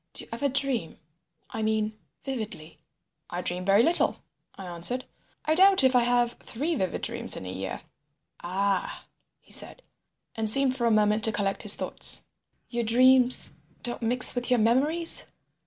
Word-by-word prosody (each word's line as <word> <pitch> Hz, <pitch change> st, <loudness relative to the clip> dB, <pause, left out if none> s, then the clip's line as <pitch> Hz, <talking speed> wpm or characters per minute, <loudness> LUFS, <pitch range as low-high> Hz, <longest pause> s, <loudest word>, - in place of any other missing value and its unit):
"Do -, -, -7 dB
you -, -, -18 dB
ever 280 Hz, +5 st, -2 dB
dream? 260 Hz, -, 0 dB, 0.5 s
I 225 Hz, -, -6 dB
mean 215 Hz, 0 st, -2 dB, 0.3 s
vividly." 215 Hz, -, -8 dB, 0.5 s
"I 175 Hz, -, -5 dB
dream 180 Hz, 0 st, -4 dB
very 200 Hz, +4 st, +3 dB
little," 335 Hz, +6 st, +2 dB, 0.4 s
I 195 Hz, -, -11 dB
answered. 180 Hz, +9 st, +1 dB, 0.4 s
"I 310 Hz, -, +1 dB
doubt 380 Hz, 0 st, +4 dB
if 260 Hz, -1 st, +2 dB
I 245 Hz, -, +4 dB
have 240 Hz, 0 st, +1 dB
three 295 Hz, +9 st, -4 dB
vivid 190 Hz, -, -4 dB
dreams -, -, +1 dB
in -, -, -9 dB
a 90 Hz, -, -7 dB
year." 95 Hz, 0 st, -7 dB, 0.6 s
"Ah!" 195 Hz, +2 st, -3 dB, 0.3 s
he -, -, -22 dB
said, -, -, -1 dB, 0.5 s
and 220 Hz, -1 st, 0 dB
seemed 265 Hz, +2 st, +4 dB
for 240 Hz, -3 st, -2 dB
a -, -, +2 dB
moment 215 Hz, 0 st, +1 dB
to 220 Hz, -, 0 dB
collect 200 Hz, -2 st, -3 dB
his -, -, +8 dB
thoughts. -, -, +1 dB, 0.4 s
"Your 240 Hz, -1 st, -4 dB
dreams 255 Hz, +2 st, +2 dB, 0.3 s
don't 240 Hz, -1 st, -5 dB
mix 245 Hz, +2 st, +5 dB
with 245 Hz, 0 st, -4 dB
your 250 Hz, -, +2 dB
memories?" 280 Hz, +9 st, +1 dB
235 Hz, 165 wpm, -25 LUFS, 205-260 Hz, 0.6 s, his